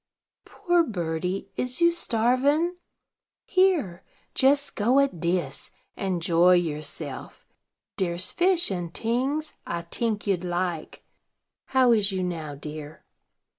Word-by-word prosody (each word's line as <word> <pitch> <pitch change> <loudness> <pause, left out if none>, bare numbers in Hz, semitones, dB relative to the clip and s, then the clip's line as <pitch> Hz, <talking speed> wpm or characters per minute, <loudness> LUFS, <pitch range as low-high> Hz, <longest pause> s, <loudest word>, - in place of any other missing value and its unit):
"Poor 350 -4 +1
birdie, 180 - -3
is 250 +3 -2
you 340 0 +5
starvin'? 285 +5 +1 0.7
Here, 360 - +2 0.3
jes 280 +2 +3
go 240 +6 +2
at 275 -11 +1
dis, 170 -5 -2 0.3
and 185 -3 -2
joy 175 +1 +5
yourself. 155 -4 -4 0.5
Dere's 180 -1 0
fish 355 - +2
and 175 -3 -3
tings 265 +7 -1
I 170 0 -3
tink 215 +4 -1
you'd 190 -4 0
like. 175 -2 -3 0.6
How 260 -2 +3
is 210 -3 +3
you 190 -1 -2
now, 160 -5 -4
dear?" 150 +1 -9
195 Hz, 115 wpm, -26 LUFS, 170-270 Hz, 0.7 s, you